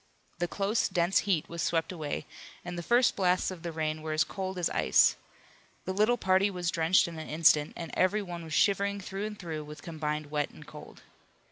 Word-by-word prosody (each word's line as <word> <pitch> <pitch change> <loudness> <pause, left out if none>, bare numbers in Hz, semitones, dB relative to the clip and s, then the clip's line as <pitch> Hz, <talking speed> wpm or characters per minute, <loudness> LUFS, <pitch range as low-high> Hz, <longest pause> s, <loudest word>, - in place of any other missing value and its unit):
The 175 - 0
close, 200 +5 0
dense 180 0 +2
heat 170 -6 +1
was 170 0 -5
swept 165 +1 0
away, 155 -5 -4 0.4
and 175 - -5
the 175 - -4
first 240 +7 +3
blasts 185 0 +1
of 180 -3 -8
the 170 0 -4
rain 155 -1 -2
were 155 0 -3
as 155 0 +3
cold 190 +2 -5
as 175 - +1
ice. - - +4 0.7
The 185 - -2
little 215 +5 +3
party 190 0 +3
was 180 -3 -2
drenched 165 +3 +3
in 165 -2 -7
an 155 - -7
instant, 155 -1 +4
and 165 - -6
every 195 +3 +2
one 175 -3 -7
was 160 -1 -7
shivering 200 +1 +2
through 195 +2 -4
and 210 -1 -8
through 160 -5 -5
with 150 0 -11
combined 150 -2 -4
wet 150 -1 0
and - - -14
cold. - - -12
175 Hz, 210 wpm, -29 LUFS, 160-195 Hz, 0.7 s, ice